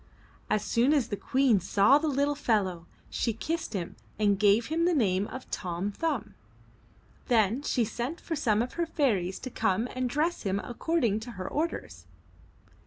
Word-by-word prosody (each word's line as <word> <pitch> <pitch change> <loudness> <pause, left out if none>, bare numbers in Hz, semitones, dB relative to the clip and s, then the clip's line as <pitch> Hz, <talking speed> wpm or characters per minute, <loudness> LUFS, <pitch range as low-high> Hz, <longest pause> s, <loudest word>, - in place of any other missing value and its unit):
As 215 - +1
soon 245 +6 +3
as 280 -7 +1
the - - -1
Queen 255 -1 +2
saw 200 - +4
the 315 - -1
little 285 0 +1
fellow, 200 - 0 0.2
she 230 - 0
kissed 325 +8 -3
him 175 -3 -4 0.2
and 205 -2 +2
gave 210 +2 +4
him 325 +5 0
the 350 -1 +3
name 200 -6 +2
of 260 - -8
Tom 180 +2 -3
Thumb. 325 +9 -2 0.9
Then 230 0 +3
she 250 -5 +1
sent 240 +9 -4
for 330 - -4
some 225 -7 +2
of 250 - -7
her 340 -1 -1
fairies 205 - 0
to 255 - -6
come 205 +4 0
and 255 -1 -1
dress 310 +6 0
him 195 -2 -1
accord 300 +9 -2
ing 215 -2 +2
to 235 +2 -8
her 185 -2 -6
orders. 280 - -3
235 Hz, 175 wpm, -28 LUFS, 200-285 Hz, 0.9 s, saw